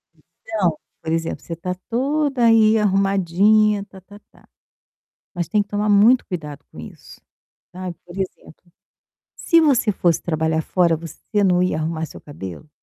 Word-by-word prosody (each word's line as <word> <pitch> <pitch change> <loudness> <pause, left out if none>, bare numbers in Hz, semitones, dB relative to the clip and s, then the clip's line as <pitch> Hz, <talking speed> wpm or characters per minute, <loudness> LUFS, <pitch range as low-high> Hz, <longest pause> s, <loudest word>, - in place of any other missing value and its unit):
Então, 185 -8 -3 0.2
por 160 - -4
exemplo, 165 0 -2
você 165 - -6
tá 180 +2 -4
toda 270 +1 0
aí 225 -1 +5
arrumadinha, 200 +1 +2
tá, 190 -1 -15
tá, 205 +2 -15
tá, - - -24 0.9
mas 175 -2 -3
tem 210 -1 +2
que 205 - -15
tomar 210 +1 -1
muito 215 +5 +5
cuidado 150 -6 -7
com - - -14
isso, - - -12 0.5
sabe? 180 -1 -6
Por 175 - -12
exemplo, 180 -2 -7 0.6
se 335 -1 +3
você 270 -8 +3
fosse 175 -4 +1
trabalhar 160 -1 -1
fora, 170 0 +1
você 170 +6 -3
não 180 -1 +3
ia 180 -4 0
arrumar 160 +1 -2
seu - - -12
cabelo? 145 - -9
190 Hz, 155 wpm, -21 LUFS, 165-215 Hz, 0.9 s, aí